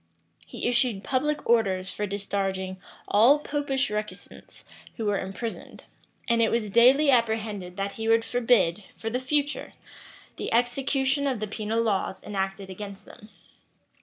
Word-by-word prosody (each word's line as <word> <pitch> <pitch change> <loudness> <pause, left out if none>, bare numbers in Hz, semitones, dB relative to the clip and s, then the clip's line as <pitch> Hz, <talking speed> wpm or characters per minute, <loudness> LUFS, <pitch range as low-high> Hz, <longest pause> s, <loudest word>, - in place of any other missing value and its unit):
He - - -4
issued 240 -4 +1
public 295 +3 -1
orders 195 -5 +2
for 210 - -3
discharging 195 -1 -3 0.3
all 235 +8 +6
Popish 285 -4 -1
recusants 210 0 -7 0.3
who 225 - -3
were 205 -1 +1
imprisoned; 195 +4 -6 0.4
and 235 -1 +3
it 225 - +4
was 220 -3 -1
daily 265 +6 +6
apprehended 220 -6 0
that 200 0 -2
he 225 +2 -5
would 225 0 +4
forbid, 230 -6 +2
for 225 - -4
the 250 - 0
future, 290 +2 -1 0.6
the - - -4
execution 265 +3 +1
of 260 -5 -1
the 215 - -2
penal 220 +2 -2
laws 195 -3 -1
enacted 195 -1 -3
against 195 +1 -8
them. 210 - -15
225 Hz, 140 wpm, -26 LUFS, 200-250 Hz, 0.6 s, all